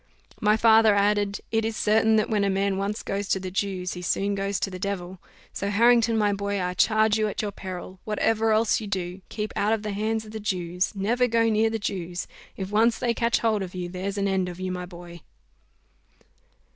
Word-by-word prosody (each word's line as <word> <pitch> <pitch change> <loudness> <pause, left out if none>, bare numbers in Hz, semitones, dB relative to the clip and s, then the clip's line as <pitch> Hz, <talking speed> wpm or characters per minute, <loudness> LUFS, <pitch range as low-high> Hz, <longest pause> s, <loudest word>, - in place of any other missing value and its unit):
My 215 +1 +4
father 220 -1 +6
added, 205 0 +1
"It 225 0 +1
is 225 0 -2
certain, 220 +1 +3
that 215 - +2
when 210 -3 +1
a 200 - +2
man 195 0 0
once 200 +2 -2
goes 200 0 -3
to 190 - +1
the 185 -1 -6
Jews, 185 -2 -2
he 180 - -7
soon 195 +3 0
goes 195 0 -1
to 195 - -1
the 185 - -7
devil. 190 -2 -4 0.3
So 200 - -2
Harrington, 230 +1 +4
my 205 -1 +2
boy, 200 0 -2
I 180 -1 -1
charge 215 +2 +3
you 215 - +2
at 210 - -3
your 205 - -2
peril, 185 -1 -8
whatever 220 +1 +1
else 220 +1 +2
you 215 - -6
do, 185 -1 -4
keep 215 -1 -4
out 210 +2 +2
of 220 -1 -2
the 210 - -3
hands 220 +2 -1
of 215 - -11
the 220 - -5
Jews 180 -2 -2
never 235 +6 +1
go 230 -1 +2
near 220 +1 +2
the 225 - -2
Jews: 180 -4 -4 0.3
if 190 0 -5
once 225 +2 +3
they 235 -1 0
catch 235 +1 +1
hold 220 -3 +1
of 185 -1 -6
you, 180 -1 -4
there's 190 +3 -4
an 200 0 +1
end 190 -2 0
of 175 0 -9
you, 185 0 -3
my 180 0 -5
boy." 175 -1 -11
200 Hz, 220 wpm, -25 LUFS, 190-220 Hz, 0.3 s, father